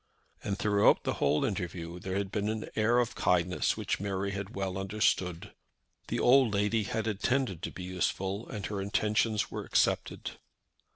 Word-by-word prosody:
And 100 -1 -2
throughout 105 -1 +4
the - - 0
whole 75 - +3
interview 90 -3 -4
there 95 +1 -4
had 100 -1 -2
been 105 -1 -1
an 110 0 -3
air 110 +2 +3
of 120 -1 +1
kindness 90 0 +1
which - - -2
Mary 100 0 -2
had 100 +2 -5
well 95 -1 -2
understood. 95 -3 0 0.5
The - - -2
old 125 -4 +5
lady 105 +2 +1
had 110 +2 -2
intended 110 - 0
to 100 - -4
be 90 - -8
useful, 95 +3 -2
and 105 -3 -5
her 100 0 -3
intentions 105 +2 +1
were - - -4
accepted. - - 0
100 Hz, 165 wpm, -30 LUFS, 95-110 Hz, 0.5 s, old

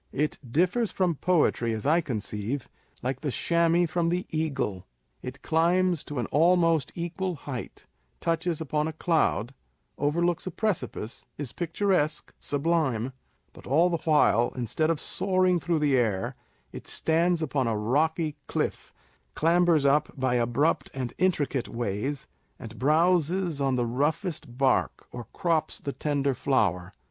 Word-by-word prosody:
It 150 +3 -1
differs 185 - +2
from 180 -3 +1
poetry, 150 -8 +1
as 110 +2 -4
I 160 +4 +4
con 125 -9 -3
ceive, 105 +6 -3 0.4
like 130 +1 -2
the 150 - -2
chamois 170 +4 +2
from 165 +1 0
the 180 +1 -1
eagle: 135 - -2 0.3
it 125 +2 -8
climbs 175 +1 +2
to 145 - -6
an 120 - 0
almost 165 -2 +3
equal 175 +2 -3
height, 135 -4 -7 0.3
touches 165 0 -1
upon 150 0 -1
a 160 - -4
cloud, 155 -7 +1 0.5
overlooks 170 +5 0
a - - 0
precipice, 180 - -3
is 145 -4 -5
picturesque, 170 -3 0
sublime 145 -6 0
â€" - - -16 0.4
but - - -14
all 165 +7 +3
the 170 - +1
while, 150 -7 +3
instead 130 +6 -1
of 165 -3 +1
soaring 185 -1 +1
through 170 +1 0
the 145 -3 +2
air, 110 -7 0 0.4
it - - -9
stands 165 +1 +1
upon 135 -4 0
a 110 -2 0
rocky 150 +7 0
cliff, - - -2 0.4
clambers 165 -2 +3
up 140 +2 +3
by 130 -1 +1
abrupt 125 +6 +1
and 125 -3 -3
intricate 145 -8 +1
ways, 120 +5 -3 0.3
and 115 -2 -10
browzes 170 +2 +2
on 135 -1 +1
the 120 -1 +1
roughest 140 - -2
bark, 135 -1 +1
or 120 -1 -7
crops 170 -5 -1
the 140 - -4
tender 140 -2 0
flower. 105 -9 0
150 Hz, 145 wpm, -27 LUFS, 130-170 Hz, 0.5 s, I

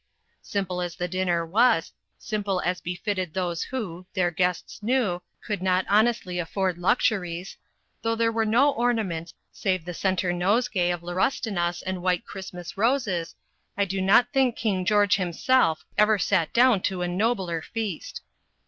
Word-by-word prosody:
Simple 185 -3 -3
as 175 -1 -4
the 180 - -2
dinner 175 -2 0
was 220 +1 +3 0.3
simple 205 -4 -2
as 180 -1 -1
befitted 180 0 -3
those 175 -3 -1
who, 185 -9 -5
their 180 -2 +2
guests 180 +3 -1
knew, 210 -6 +1 0.2
could 205 -4 -3
not 185 0 +2
honestly 210 -4 +2
afford 180 +1 -1
luxuries; 180 -3 0 0.5
though 225 0 0
there 230 0 +2
were 225 0 +1
no 255 +7 +4
ornaments, 220 -10 -1 0.2
save 185 -4 -1
the 175 - -5
centre 185 0 0
nosegay 185 0 +1
of 175 -1 -2
laurustinus 175 -1 -1
and 185 -1 -3
white 180 -1 0
Christmas 185 -2 -8
roses 205 - 0 0.4
I 200 - +2
do 190 0 -2
not 220 +6 +4
think 260 -3 +3
King 195 -5 -1
George 205 -1 +4
himself 180 0 +1
ever 210 0 +5
sat 180 -4 +1
down 240 -4 +4
to 185 -2 -1
a - - 0
nobler 185 -3 0
feast. 215 -3 -5
185 Hz, 150 wpm, -25 LUFS, 175-220 Hz, 0.5 s, ever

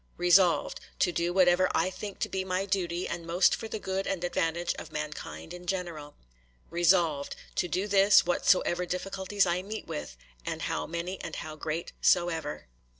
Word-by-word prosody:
'Resolved, 175 0 +4 0.2
To 180 - +2
do 170 0 0
whatever 180 0 +4
I 185 - +2
think 200 +1 -7
to - - +1
be 190 0 -2
my 185 +1 -1
duty 180 -3 -1
and 170 0 -4
most 170 +3 +3
for 225 - -6
the 220 - -4
good 190 -1 -3
and 190 -3 -2
advantage 170 0 0
of - - -9
mankind 150 +2 -6
in 180 0 -10
general. 170 -6 -4 0.6
'Resolved, 170 -4 +2 0.2
To - - +1
do 185 +4 -1
this, 200 0 +6
whatsoever 180 0 +2
difficulties 190 +2 -1
I 175 0 0
meet 210 +3 -6
with, 75 -5 -6 0.3
and - - -4
how - - -2
many 170 +3 -4
and - - -6
how 155 -1 -6
great 155 +2 -4
soever. 165 -4 +1
175 Hz, 170 wpm, -29 LUFS, 170-190 Hz, 0.6 s, this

